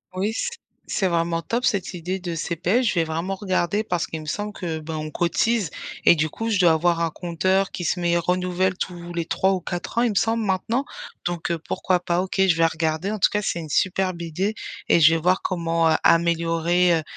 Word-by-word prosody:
Oui, 190 +3 0
s 485 - -2 0.4
c'est 190 - +1
vraiment 165 -1 0
top, 240 +2 -1
cette 195 -3 0
idée 180 +2 -3
de 175 -2 -4
CPF. 175 +8 0
Je 210 - +1
vais 170 - +3
vraiment 165 +4 -3
regarder, 190 +1 0
parce 175 -5 -1
qu'il 160 -1 -6
me - - -10
semble 205 +7 -3
que 165 -5 -4
ben, 155 +1 -6
on 155 0 -5
cotise. 190 +2 +1 0.4
Et - - +8
du 155 0 0
coup 225 +8 -4
je 205 -3 +1
dois 175 -3 +6
avoir 170 +1 +2
un 165 -1 0
compteur 185 +3 0
qui 175 - -6
se 180 - 0
met 170 0 +2
renouvelle 180 +1 0
tous 175 -1 -6
les 170 -1 -2
3 185 +4 +1
ou 185 - -2
4 175 +7 -3
ans - - +4
il 240 - +3
me 210 - -3
semble 225 +3 +1
maintenant. 220 +7 0 0.4
Donc, 175 -1 -3
heu, 170 - -1
pourquoi 180 +3 0
pas? 175 0 0
OK, 190 +1 -1
je 170 - +4
vais 165 - +4
regarder. 165 +3 -1
En 215 - -3
tout - - +5
cas 210 -1 -1
c'est 170 - -1
une 155 -2 -7
superbe 185 +2 0
idée 190 +7 -2 0.3
et - - +5
je 160 +1 +7
vais 165 - 0
voir 180 +2 +2
comment, 165 -2 +1
heu, 155 - +4
améliorer, 170 +1 +3
heu, - - -6
175 Hz, 230 wpm, -23 LUFS, 165-190 Hz, 0.4 s, Et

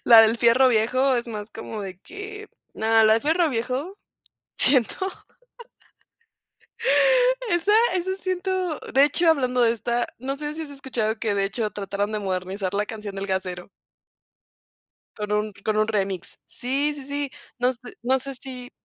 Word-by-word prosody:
La 230 -2 +9
del 225 +1 +3
fierro 240 +3 +5
viejo 255 +3 +2
es 235 - -2
más 215 -1 -6
como 225 -1 -7
de 190 -2 -7
que 415 - -9 0.3
no, 220 - -3 0.2
la 220 - +6
del 225 - 0
fierro 325 +2 +2
viejo, 260 - -3 0.6
siento 260 -4 +4 2.6
esa 345 +4 +2 0.2
esa 375 +1 -1
siento 370 -3 -2
de 270 +1 +6
hecho, 325 +4 +4
hablando 255 -5 +2
de 230 - +5
esta, 235 +1 -1
no 270 +3 -4
sé 295 +1 -4
si 325 - -4
has 305 - -7
escuchado 235 -5 -2
que, 215 -3 0
de 195 0 +1
hecho, 215 +1 -2
trataron 200 +1 -3
de 215 - -2
modernizar 185 0 -3
la 205 +1 0
canción 210 -2 -7
del 195 +1 -4
gasero. 185 -1 -3 1.5
Con 210 -1 -4
un 210 0 0
con 215 -1 0
un 215 0 +3
remix. 195 -4 -2
Sí, 280 +4 0
sí, 280 - -8
sí. 285 0 -3 0.3
No 250 +1 +2
sé 235 - -20 0.2
no 260 +2 +2
sé 275 +1 -5
si 250 0 -5
240 Hz, 160 wpm, -24 LUFS, 210-285 Hz, 2.6 s, La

